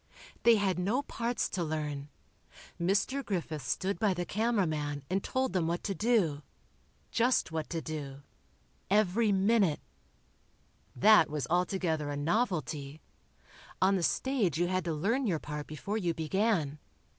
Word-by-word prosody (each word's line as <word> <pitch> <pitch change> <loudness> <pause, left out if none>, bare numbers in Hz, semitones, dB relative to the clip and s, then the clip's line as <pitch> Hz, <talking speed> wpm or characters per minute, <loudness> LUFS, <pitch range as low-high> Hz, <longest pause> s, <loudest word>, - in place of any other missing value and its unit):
They 235 -1 +6
had 195 -4 +1
no 220 +10 0
parts 240 -2 -2
to 180 - -2
learn. 150 -2 -3 0.7
Mr. 200 +10 +1
Griffith 170 - -3
stood 170 +9 -2
by 205 -4 +2
the 175 0 -2
camera 215 +2 +1
man 145 -3 -3
and 190 +1 0
told 260 0 -1
them 175 -4 +1
what 170 +1 -2
to 200 - -1
do. 195 -10 +1 0.7
Just 245 -6 +2
what 160 -1 -3
to 165 -1 -3
do. 140 -3 -6 0.7
Every 210 +2 +3
minute. 195 -4 +3 1.2
That 205 - +6
was 150 -3 -2
altogether 175 -4 0
a 145 - -3
novelty. 155 - -1 0.8
On 190 +1 +4
the 185 - 0
stage 210 - +1
you 175 - +2
had 185 -1 -1
to 165 - -1
learn 230 - 0
your 175 -5 +1
part 150 0 -6
before 200 +8 -3
you 170 -4 -1
began. 165 -3 0
180 Hz, 145 wpm, -31 LUFS, 155-210 Hz, 1.2 s, They